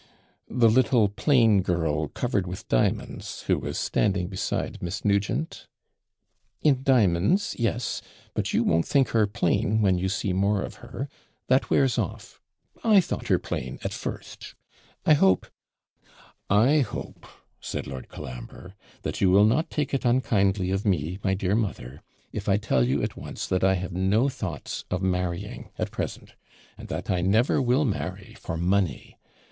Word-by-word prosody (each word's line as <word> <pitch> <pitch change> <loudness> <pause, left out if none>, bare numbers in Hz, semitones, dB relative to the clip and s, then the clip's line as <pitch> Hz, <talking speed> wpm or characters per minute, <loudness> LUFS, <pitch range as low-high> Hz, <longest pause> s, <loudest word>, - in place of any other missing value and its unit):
'The 120 -1 +4
little, 115 -2 +4
plain 115 -3 +4
girl, 80 -4 0
covered 100 - -1
with 90 +1 -7
diamonds, - - -1
who - - +2
was - - -4
standing 100 -4 +1
beside 95 -1 -3
Miss 85 +4 -4
Nugent?' 100 +10 0 1.0
'In 140 -4 +3
di'monds, 125 - +2
yes. 120 +1 -1 0.3
But - - -1
you - - +2
won't 80 0 +2
think 135 -3 +3
her 110 -2 +3
plain 105 0 +1
when 95 -3 +3
you 95 +1 0
see 100 -1 -1
more 100 +1 +1
of - - -7
her 135 - -6 0.4
that 130 +1 +3
wears 135 -4 +3
off; - - -5 0.4
I 215 -3 +6
thought 180 - -2
her - - +4
plain, 65 0 -5
at - - -3
first - - -7 0.5
I 155 - +6
hope 95 -10 +4 0.5
' - - -28
'I 120 +10 +5
hope,' 125 -7 -4 0.3
said - - -4
Lord 65 -1 -8
Colambre, 60 +9 -9 0.3
'that - - -3
you 95 - +5
will 100 +3 +6
not 150 +9 +2
take 150 -2 -2
it 135 - 0
unkindly 100 -6 +2
of 95 +1 -1
me, 90 -2 0
my 95 -1 +1
dear 95 0 -1
mother, 85 - -2 0.3
if 105 -1 -4
I 100 - +4
tell 70 - +1
you, 65 +3 +1
at - - -2
once, - - -6
that 95 0 0
I 95 0 +4
have 95 0 -4
no 100 +8 +2
thoughts 105 - -5
of 90 +1 -2
marrying 90 -2 -2
at - - -2
present - - -5 0.4
and - - -10
that - - -3
I 90 -1 +1
never 110 +10 +3
will 130 +4 +2
marry 95 -4 -4
for 80 - -4
money. 90 -3 -1
100 Hz, 165 wpm, -26 LUFS, 90-120 Hz, 1.0 s, I